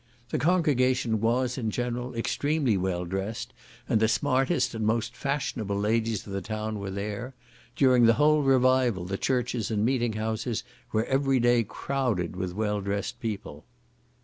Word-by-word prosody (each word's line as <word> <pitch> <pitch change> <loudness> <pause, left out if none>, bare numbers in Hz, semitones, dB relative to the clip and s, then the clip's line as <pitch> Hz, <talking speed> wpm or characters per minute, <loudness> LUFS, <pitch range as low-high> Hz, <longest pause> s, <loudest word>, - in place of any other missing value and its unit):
The - - -1
congregation 130 - +2
was, 125 +3 +1
in 110 -3 -1
general, 120 +2 -3
extremely 140 +1 0
well 90 -1 -1
dressed, 95 +5 -4 0.3
and 110 - +2
the 110 - +4
smartest 135 +6 +1
and 110 -1 -3
most 115 +2 0
fashionable 130 -8 -2
ladies 110 +1 0
of 100 - -8
the 100 - -2
town 110 +1 -4
were 100 -1 -4
there; 105 +6 -5 0.4
during 125 -4 +5
the 115 - +5
whole 150 0 +4
revival 130 -7 +3
the 95 +2 -3
churches 125 -4 0
and 110 -1 +1
meeting 120 -2 +1
houses 110 +1 -2 0.3
were 110 +1 +1
every 135 -1 +2
day 120 0 +4
crowded 115 -6 -2
with 90 -1 -4
well 105 -1 -1
dressed 100 0 -3
people. 100 -10 -5
115 Hz, 155 wpm, -27 LUFS, 105-130 Hz, 0.4 s, during